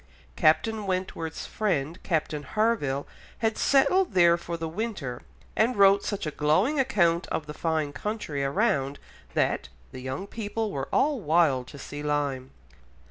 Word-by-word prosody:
Captain 210 +6 +2
Wentworth's 185 -3 -3
friend, 170 -6 -1
Captain 155 -3 -1
Harville, 145 - 0 0.3
had 225 -1 0
settled 350 - +3
there 170 -1 +6
for 170 0 -5
the 165 0 -3
winter, 165 - -4 0.3
and 235 +3 +2
wrote 200 0 +6
such 205 -4 -3
a 155 - -2
glowing 180 - +2
account 180 -10 +2
of 155 - -3
the 150 - -7
fine 155 -3 -1
country 160 -5 -3
around 140 -3 +1 0.4
that - - +1 0.2
"the 130 - -8
young 130 +8 -4
people 220 +1 -3
were 135 -4 -4
all 290 -2 +2
wild 155 - +2
to 140 - -11
see 145 +1 -7
Lyme." 145 -3 -1
170 Hz, 145 wpm, -27 LUFS, 145-215 Hz, 0.4 s, there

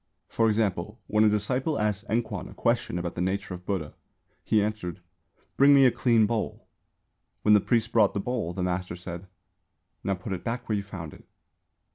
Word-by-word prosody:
For 115 -1 +2
example, 105 0 -1
when 105 0 +2
a 110 - +6
disciple 125 +8 0
asked 105 0 -1
Enkwan 115 0 -2
a - - -13
question 115 -6 0
about 85 -1 -3
the 90 - -4
nature 95 +2 -2
of 90 0 -10
Buddha, 95 -7 -2 0.5
he 110 - +2
answered, 105 -3 -3 0.6
"Bring 140 +1 +7
me 135 -1 +7
a 125 - +6
clean 115 -2 +3
bowl." 110 0 -3 0.8
When 105 - +5
the 105 - +6
priest 115 0 +1
brought 110 -4 +4
the - - +1
bowl, 115 -5 -2
the 90 +1 -3
master 90 0 -2
said, 90 +1 -8 0.8
"Now 95 - 0
put 95 +2 -5
it 90 - -5
back 120 +2 -3
where 110 - 0
you 100 - 0
found 80 -6 -8
it." - - -16
105 Hz, 190 wpm, -27 LUFS, 90-115 Hz, 0.8 s, Bring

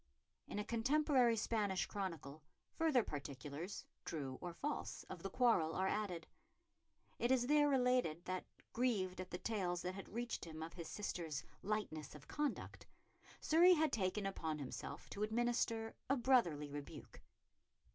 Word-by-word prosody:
In - - -5
a 210 - 0
contemporary 255 0 +4
Spanish 210 -3 +1
chronicle 165 -7 -4 0.3
further 310 -7 +3
particulars, 145 +4 -5 0.2
true 135 -5 -4
or 175 - -3
false, 285 - -3
of - - -6
the - - -3
quarrel 205 -11 +3
are 190 +1 +2
added. 190 -6 -1 0.9
It 240 - +2
is 255 -2 +4
there 295 +2 +5
related 250 - +2
that, 185 0 -2 0.3
grieved 195 -7 +1
at 185 - -7
the 180 - -3
tales 180 -5 -1
that 180 - -2
had 195 0 -8
reached 235 +1 -3
him 160 -1 -6
of 165 - -6
his 170 -3 -6
sister's 165 -7 -3 0.2
lightness 185 -9 -2
of 145 - -12
conduct, 295 -1 -2 0.5
Surrey 345 +3 +7
had 315 -3 +3
taken 200 -2 0
upon 160 -5 -2
himself 140 -3 -6
to 200 - -5
administer 225 0 +1 0.2
a 275 - +4
brotherly 175 - +3
rebuke. 145 0 -8
200 Hz, 145 wpm, -39 LUFS, 165-240 Hz, 0.9 s, Surrey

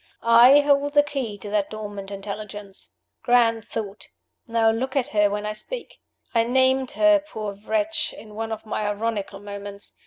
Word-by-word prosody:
"I 240 +5 +7
hold 285 0 +2
the 290 -1 +6
key 270 -8 -4
to 205 +1 -8
that 205 -2 0
dormant 205 -2 -7
Intelligence. 200 0 -7 0.3
Grand 230 -2 +3
thought! 205 -2 -6 0.4
Now 225 -1 +3
look 260 +4 -3
at 270 -3 +1
her 210 -1 +3
when 205 +1 -3
I 210 - -2
speak. 475 - -7 0.3
(I 230 -1 +4
named 260 +2 +2
her, 315 -1 +5
poor 220 -9 -6
wretch, 310 +9 -1
in 215 -1 -12
one 225 +1 -4
of 220 0 -5
my 215 -1 -2
ironical 205 -1 -3
moments. 200 0 -8
225 Hz, 165 wpm, -24 LUFS, 205-260 Hz, 0.4 s, I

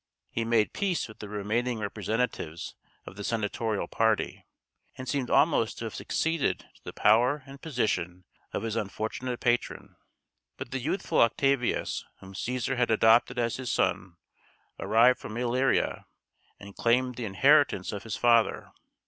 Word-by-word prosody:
He 115 - -1
made 115 -2 +2
peace 195 -4 -1
with 110 - -14
the 105 - -8
remaining 110 +4 -1
representatives 105 -5 -3 0.3
of 95 - -11
the 100 - -6
senatorial 110 -1 -2
party, 110 -1 0 0.5
and 130 - -7
seemed 135 -2 -1
almost 140 -8 +3
to 115 - -5
have 110 - -5
succeeded 160 -3 -1
to - - -26
the - - -7
power 125 +7 +3
and 140 0 -12
position 90 - -2 0.3
of - - -3
his 115 -1 -2
unfortunate 115 +3 -3
patron. 120 0 -1 0.6
But - - -7
the 135 - -2
youthful 165 +10 0
Octavius, 130 +1 +1 0.2
whom 95 0 -12
Cæsar 125 +5 -2
had 125 -1 +1
adopted 115 +3 +4
as 115 -1 0
his 130 -1 -3
son, 90 -2 -1 0.6
arrived 120 +3 +4
from 110 - -7
Illyria, 125 +2 0 0.5
and 100 0 -11
claimed 125 +2 +2
the 120 -1 -5
inheritance 135 -1 +3
of 100 -2 -5
his 110 -2 -5
"father." 115 -2 +2
115 Hz, 150 wpm, -28 LUFS, 110-125 Hz, 0.6 s, adopted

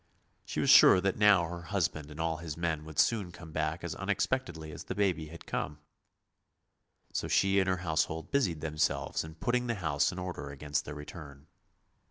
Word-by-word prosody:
She - - -4
was - - +4
sure 95 - +9
that 95 0 0
now 105 -4 +6
her 85 +1 -6
husband 85 -5 -2
and 75 +1 -10
all 80 -1 0
his 80 -1 -6
men 80 -3 -2
would 80 -2 -10
soon 105 -6 +2
come 85 -2 -11
back 80 +1 -2
as 85 - -3
unexpectedly 95 -5 -2
as - - -9
the - - -4
baby 90 -6 0
had 85 +2 -11
come. 75 - -3 1.4
So - - -1
she 95 0 +3
and 95 -1 +1
her 95 - +1
household 80 0 -1
busied 90 - +1
themselves 75 -2 -1
in 80 0 -10
putting 125 +8 0
the 115 - 0
house 80 -7 +1
in 90 - -8
order 90 -5 -5
against 75 +1 -3
their 75 - -6
return. 75 -1 -10
85 Hz, 190 wpm, -31 LUFS, 75-95 Hz, 1.4 s, sure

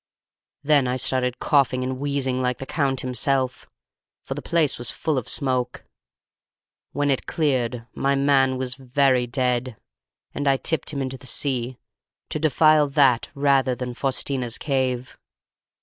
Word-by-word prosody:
"Then 145 -3 +3
I 125 +1 -1
started 125 -1 -1
coughing 130 -3 +2
and 130 0 -3
wheezing 135 -2 -1
like 125 -1 0
the 135 - -7
Count 135 -3 -1
himself, 130 +1 -1 0.5
for - - -4
the - - -6
place 165 -7 0
was 120 -2 -2
full 155 -2 -2
of 130 -4 -2
smoke. 130 -3 -1 1.1
When 145 0 0
it 135 - -2
cleared 125 -7 -1
my 140 0 +1
man 135 -1 +3
was 130 -1 -2
very 130 -1 +1
dead, 125 -2 -1 0.6
and 145 - -3
I 135 -1 +4
tipped 155 +1 -2
him 140 -2 -2
into 130 0 -5
the 130 - -10
sea, 125 -2 -1 0.5
to - - -3
defile 155 0 +4
that 135 -4 +3
rather 140 -2 +2
than 125 0 -5
Faustina's 130 -2 -1
cave. 130 -3 -2
130 Hz, 150 wpm, -23 LUFS, 125-140 Hz, 1.1 s, I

